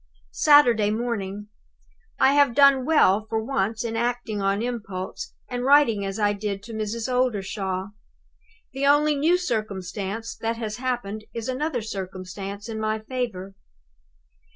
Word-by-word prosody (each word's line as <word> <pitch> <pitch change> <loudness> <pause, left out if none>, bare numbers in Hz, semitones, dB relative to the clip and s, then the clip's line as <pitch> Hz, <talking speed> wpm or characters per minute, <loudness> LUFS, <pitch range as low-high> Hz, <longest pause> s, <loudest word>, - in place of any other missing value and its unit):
"Saturday 245 -8 +5
morning. 210 -3 -3 0.7
I 270 - +5
have 285 -4 +4
done 275 -2 +6
well 215 -9 +3
for 225 - -1
once 220 -2 -1
in 230 -1 -3
acting 235 -3 -2
on 195 +2 0
impulse, 215 - -5
and 245 -1 -4
writing 265 -7 +4
as 195 +1 -4
I 205 -1 +2
did 200 -1 -4
to 230 - -9
Mrs. 220 +2 -3
Oldershaw. 200 -6 -1 0.8
The 275 +1 0
only 295 +1 +4
new 320 +5 +3
circumstance 215 - -3
that 230 0 -2
has 215 -2 -4
happened 240 -5 -3
is 230 -1 -4
another 260 -1 -2
circumstance 195 0 -6
in 220 -1 -5
my 215 0 0
favor! 215 -5 -4
220 Hz, 135 wpm, -24 LUFS, 200-250 Hz, 0.8 s, done